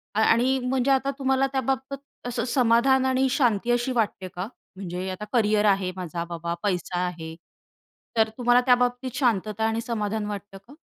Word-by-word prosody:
अ - - +2
आणि 245 +4 +3
म्हणजे 260 +1 +1
आता 270 +1 +2
तुम्हाला 265 0 +2
त्याबाबत 265 +1 -1 0.3
असं 245 0 -2
समाधान 255 +2 +3
आणि 260 0 +2
शांती 240 -3 +1
अशी 240 +2 +1
वाटते 210 -5 -1
का? 180 +2 -6 0.3
म्हणजे 185 0 -5
आता 210 +3 -6
करियर 215 -2 +3
आहे 195 -2 +2
माझा, 175 -2 -4
बाबा 170 0 -4
पैसा 180 -2 -1
आहे. 165 -2 -6 0.8
तर 220 0 +4
तुम्हाला 245 0 +4
त्याबाबतीत 245 0 +2
शांतता 220 -4 0
आणि 225 +1 -1
समाधान 215 -2 -2
वाटतं 205 -1 -6
का? 280 - -14
230 Hz, 160 wpm, -25 LUFS, 195-255 Hz, 0.8 s, तर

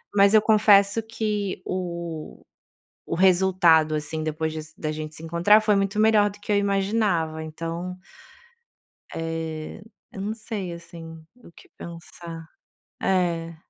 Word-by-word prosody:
mas 200 +1 +5
eu 215 - +7
confesso 210 -1 +5
que 210 -4 -3
o 170 -3 -5 0.6
o - - -2
resultado, 180 -4 +4
assim, 155 +1 -3
depois 155 0 -2
de 155 -1 -5
se 155 +1 -13
da 155 -1 -2
gente 155 0 -6
se - - -8
encontrar 175 +6 +4
foi 210 -1 +2
muito 195 +1 0
melhor 215 -1 +4
do 205 - -15
que 210 - -5
eu - - +4
imaginava. 195 -5 0
Então... 165 +3 -5 1.2
eh, 165 +2 -5 0.3
eu 195 - -7
não 210 +2 -2
sei 210 -5 -5
assim 165 -1 -11 0.2
o - - -15
que - - -18
pensar. 165 -1 -9 0.5
É. 170 -3 0
175 Hz, 140 wpm, -24 LUFS, 160-200 Hz, 1.2 s, eu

